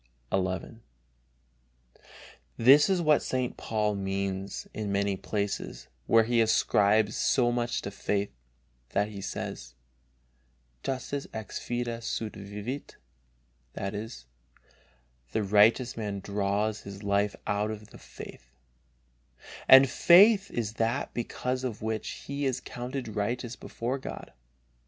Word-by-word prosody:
XI. 95 +4 -1 1.8
This 140 - +7
is 185 -3 +2
what 155 -2 +4
St. 130 -1 -2
Paul 105 -1 -1
means 95 0 -3
in 105 -2 -3
many 100 0 +1
places, 95 - -4 0.2
where 115 0 +6
he 115 +1 +2
ascribes 105 -1 +3
so 120 -2 +2
much 120 0 -1
to 100 - -4
faith, 100 0 -1 0.6
that 100 +1 +1
he 100 -2 -7
says: - - -6 1.1
Justus 135 - -3
ex 110 -2 -5
fide 120 -1 -3
sua 110 -1 -3
vivit, 105 +7 -6 0.8
"the 100 - -5 1.2
righteous 110 +5 +4
man 105 -3 -3
draws 100 +2 -1
his 100 +1 -9
life 100 0 +1
out 105 +1 0
of 105 -1 -7
his - - -14
faith," - - -11 1.2
and 135 +1 +10
faith 195 - +6
is 110 -3 -3
that 115 +5 0
because 125 +2 -3
of 115 -5 -4
which 110 0 -3
he 140 0 -3
is 130 -1 -1
counted 125 0 -5
righteous 120 +3 -2
before 125 +4 -4
God. - - -8
110 Hz, 115 wpm, -29 LUFS, 100-125 Hz, 1.8 s, and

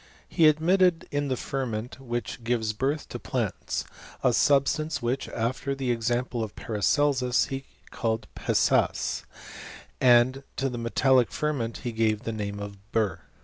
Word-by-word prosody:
He 165 -3 +4
admitted 170 +3 +3
in 145 0 0
the 130 -2 -1
ferment 125 -3 -4
which 120 -2 -4
gives 115 -2 0
birth 140 +7 -1
to - - -6
plants, - - -2 0.4
a - - +4
substance 145 +2 +2
which, 125 +2 -2
after 130 +4 -2
the 130 -2 -1
example 120 +1 -1
of 105 - -7
Paracelsus^, 125 +3 +1
he 135 0 -4 0.3
called 110 0 -1
pessas, - - +1 0.8
and 125 +2 +5
to 135 0 0
the 120 -2 -5
metallic 125 +1 +3
ferment 140 -7 -2
he 120 - -3
gaT^ 110 -1 +1
the 115 - -2
name 100 -2 -4
of 100 -1 -7
bur. 110 -4 0
125 Hz, 145 wpm, -27 LUFS, 115-135 Hz, 0.8 s, and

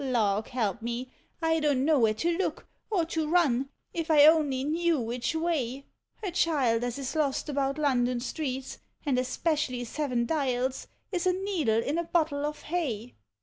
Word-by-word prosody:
Lawk 220 -5 +1
help 235 -2 -1
me, 240 +2 -4 0.3
I 325 0 +3
don't 285 -4 +2
know 310 -2 +4
where 220 -2 +3
to 335 +9 0
look, 385 - -2 0.2
or 365 -6 +1
to 320 -1 -2
run, 280 -6 +2 0.2
if 330 -1 -3
1 310 - +4
only 295 -4 +5
knew 325 +1 +1
which 240 +5 -2
way 280 -6 -1 0.2
— - - -37
A 375 - -1
Child 275 -10 +2
as 245 0 -2
is 275 +2 -4
lost 295 -2 0
about 275 0 0
London 250 -4 +1
streets, 265 0 -4 0.3
and 265 -3 +2
es 255 - -3
pecially 290 -7 0
Seven 250 -2 -1
Dials, 260 -3 -1 0.2
is 360 -2 0
a 365 - +4
needle 345 - 0
in 300 +4 -1
a - - 0
bottle 310 -4 0
of 300 - -6
hay. 255 -9 -3
280 Hz, 180 wpm, -28 LUFS, 245-320 Hz, 0.3 s, only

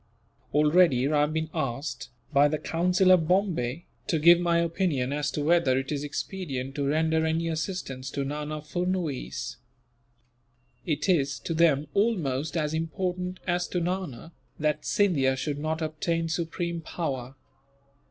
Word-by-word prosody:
Already 150 -3 +4
I 150 - +3
have 150 +1 +1
been 160 0 -2
asked, 125 -1 -3 0.2
by 140 +1 +6
the 155 +1 -1
Council 180 +4 +2
of 170 -4 +5
Bombay, 170 -6 0 0.2
to 165 - +1
give 170 +3 +7
my 170 -1 +2
opinion 165 -6 0
as 145 0 -1
to 150 - -2
whether 155 -5 +3
it 135 +2 -2
is 145 -1 -2
expedient 145 -4 -4
to 140 -1 -1
render 160 +2 +2
any 160 +1 0
assistance 155 -5 -4
to 140 - -2
Nana 150 +2 -4
Furnuwees. 175 -3 -3 1.3
It 155 0 -1
is, 140 -7 +2
to 165 - -3
them, 155 -3 +3
almost 160 - 0
as 150 -1 0
important 180 +3 -3
as 175 -1 0
to 180 - -1
Nana 175 -5 -3 0.3
that 150 -1 -1
Scindia 145 -10 +2
should 145 +2 -3
not 160 +2 -2
obtain 165 +1 -1
supreme 170 +1 -2
power. 135 -6 -4
160 Hz, 145 wpm, -27 LUFS, 145-175 Hz, 1.3 s, give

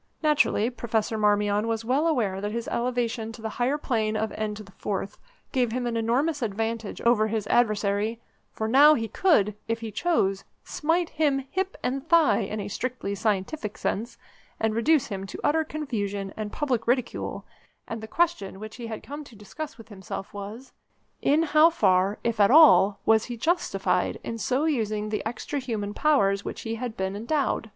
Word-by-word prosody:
Naturally 285 -6 +3
Professor 225 -2 -1
Marmion 210 0 +2
was 225 0 -2
well 275 +7 +2
aware 210 -11 0
that 205 +1 -2
his 235 +1 -4
elevation 235 -2 -1
to 225 - -11
the 220 - -2
higher 265 +4 +2
plane 220 -6 -1
of 220 +1 -1
N4 205 -2 -4 0.4
gave 250 -4 +1
him 245 +1 -2
an 235 -1 -2
enormous 260 +7 0
advantage 225 0 -3
over 235 -2 +3
his 220 -1 -2
adversary, 215 -1 +1 0.3
for 220 - -3
now 290 +6 +7
he 225 -3 -2
could, 215 - +3
if 230 0 -2
he 225 -1 -5
chose, 195 - 0 0.2
smite 330 +2 0
him 300 -3 +1
hip 380 +1 -2
and 270 +4 -2
thigh, 335 -2 +5
in 215 0 -3
a 200 - -4
strictly 245 -1 -3
scientific 210 +3 -2
sense, 230 +3 -3 0.4
and 220 -1 +1
reduce 265 +5 +3
him 195 -1 -5
to - - -8
utter 320 +2 +2
confusion 205 -11 -4
and 215 -1 -5
public 255 -7 -1
ridicule, 250 0 -1 0.4
and 225 -1 -5
the 220 - -7
question 335 - 0
which 215 +2 -8
he 235 -2 -6
had 220 -1 -6
come 290 +2 -7
to 250 - -15
discuss 230 +6 -8
with 225 -1 -14
himself 195 -1 -7
was: 205 +6 -8 0.5
In 305 +3 +3
how 310 +1 +5
far, 195 - +2
if 230 -2 -1
at 200 - +6
all, 250 -9 +7
was 220 0 +4
he 240 -1 -6
justified 345 +9 0
in 230 - -5
so 255 +8 0
using 215 -8 -1
the 215 - -2
extra 260 +5 -4
human 215 -6 -3
powers 200 -11 +2
with - - -4
which - - -9
he 225 - -4
had 230 0 -5
been 190 +1 -2
endowed? 235 +1 -1
225 Hz, 180 wpm, -26 LUFS, 210-270 Hz, 0.5 s, now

